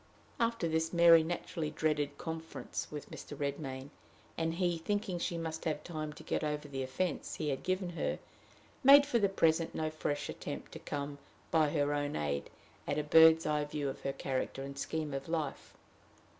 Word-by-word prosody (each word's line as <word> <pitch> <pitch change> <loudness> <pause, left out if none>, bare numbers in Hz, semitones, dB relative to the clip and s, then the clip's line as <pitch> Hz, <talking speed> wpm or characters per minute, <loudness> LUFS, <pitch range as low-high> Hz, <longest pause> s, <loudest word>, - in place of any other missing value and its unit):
After 230 -6 +1
this, 160 0 0
Mary 170 -1 +8
naturally 165 -1 -3
dreaded 150 -2 0
conference 160 -1 -5
with 150 -1 -7
Mr. 145 - -8
Redmain; 140 -1 -4 0.4
and 165 0 -1
he, 175 -2 +1
thinking 200 +1 -1
she 170 0 -2
must 160 -1 -4
have 150 -2 -1
time 155 -3 -4
to 155 - -12
get 155 - -1
over 150 -1 -2
the 135 -2 -4
offense 130 +6 -2
he 155 -2 -2
had 135 -2 -2
given 185 -1 -1
her, 170 - -1 0.7
made 280 +2 +9
for 245 -5 +2
the 200 -2 +3
present 165 -3 +2
no 155 0 -1
fresh 150 -2 -2
attempt - - -6
to - - -8
come, 145 0 -4 0.3
by 155 -2 +4
her 145 -1 +1
own 145 0 -1
aid, 70 -1 -2 0.4
at 145 - 0
a 150 - +1
bird's 160 +2 +7
eye 150 -1 +1
view 145 -1 -2
of 135 - -7
her 135 - -1
character 135 0 -3
and 140 0 -7
scheme 155 0 -2
of 135 +2 -4
life. 155 -4 -3
155 Hz, 185 wpm, -33 LUFS, 145-165 Hz, 0.7 s, made